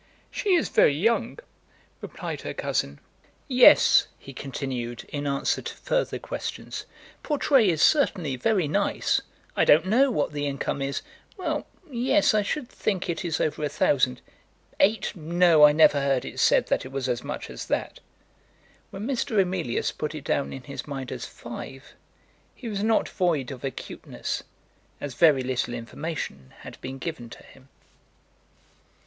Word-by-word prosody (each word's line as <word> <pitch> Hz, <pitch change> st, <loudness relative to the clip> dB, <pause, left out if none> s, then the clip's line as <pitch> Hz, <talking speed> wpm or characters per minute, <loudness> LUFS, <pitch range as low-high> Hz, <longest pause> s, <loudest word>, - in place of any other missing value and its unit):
"She 390 Hz, -3 st, +1 dB
is 335 Hz, -, +1 dB
very 145 Hz, -, +4 dB
young," 225 Hz, -, +1 dB, 0.6 s
replied -, -, -6 dB
her -, -, -6 dB
cousin. -, -, -2 dB, 0.5 s
"Yes," 255 Hz, -3 st, +7 dB
he 135 Hz, -, -12 dB
continued, 125 Hz, -3 st, -5 dB
in 145 Hz, -1 st, -3 dB
answer 140 Hz, 0 st, 0 dB
to -, -, -6 dB
further -, -, -1 dB
questions; -, -, -6 dB, 0.3 s
"Portray 275 Hz, -, +3 dB
is 160 Hz, -3 st, +2 dB
certainly 180 Hz, -, +3 dB
very 180 Hz, -, +1 dB
nice. 145 Hz, -, +1 dB, 0.3 s
I -, -, +3 dB
don't 155 Hz, +4 st, +5 dB
know 250 Hz, +8 st, +4 dB
what 150 Hz, -, 0 dB
the 145 Hz, -1 st, -2 dB
income 140 Hz, 0 st, -2 dB
is. 135 Hz, 0 st, -2 dB, 0.3 s
Well; 375 Hz, -, -2 dB, 0.2 s
yes. 265 Hz, +1 st, +2 dB
I 215 Hz, -, +3 dB
should 250 Hz, +6 st, -3 dB
think 195 Hz, -6 st, -2 dB
it 170 Hz, -, -4 dB
is 165 Hz, -3 st, -1 dB
over 155 Hz, 0 st, -1 dB
a 150 Hz, -, 0 dB
thousand. 130 Hz, -3 st, +1 dB, 0.6 s
Eight! 210 Hz, +1 st, +2 dB
No, 170 Hz, -1 st, +5 dB
I 150 Hz, -, +7 dB
never 150 Hz, -1 st, +5 dB
heard 135 Hz, -2 st, +1 dB
it -, -, -7 dB
said -, -, +4 dB
that -, -, +1 dB
it 130 Hz, -, -9 dB
was 135 Hz, -1 st, -2 dB
as 120 Hz, -2 st, -1 dB
much -, -, -5 dB
as -, -, -7 dB
that." -, -, -2 dB, 0.9 s
When 195 Hz, +2 st, -6 dB
Mr. 240 Hz, -5 st, 0 dB
Emilius 180 Hz, -9 st, 0 dB
put 150 Hz, +1 st, -4 dB
it 150 Hz, -, -7 dB
down 140 Hz, -, -1 dB
in 135 Hz, -, -8 dB
his 140 Hz, +3 st, -7 dB
mind 135 Hz, -3 st, -5 dB
as -, -, -5 dB
five, 130 Hz, +3 st, -9 dB, 0.6 s
he 245 Hz, -, -8 dB
was 205 Hz, -3 st, -3 dB
not 220 Hz, +1 st, +2 dB
void 165 Hz, -9 st, 0 dB
of 130 Hz, -3 st, -9 dB
acuteness, 135 Hz, -, -5 dB, 0.6 s
as 145 Hz, -2 st, -5 dB
very 145 Hz, -3 st, +4 dB
little 125 Hz, -1 st, -2 dB
information 115 Hz, -, -6 dB
had -, -, -11 dB
been 130 Hz, +1 st, -6 dB
given 135 Hz, -5 st, -6 dB
to -, -, -12 dB
him. 135 Hz, 0 st, -19 dB
150 Hz, 160 wpm, -26 LUFS, 135-205 Hz, 0.9 s, Yes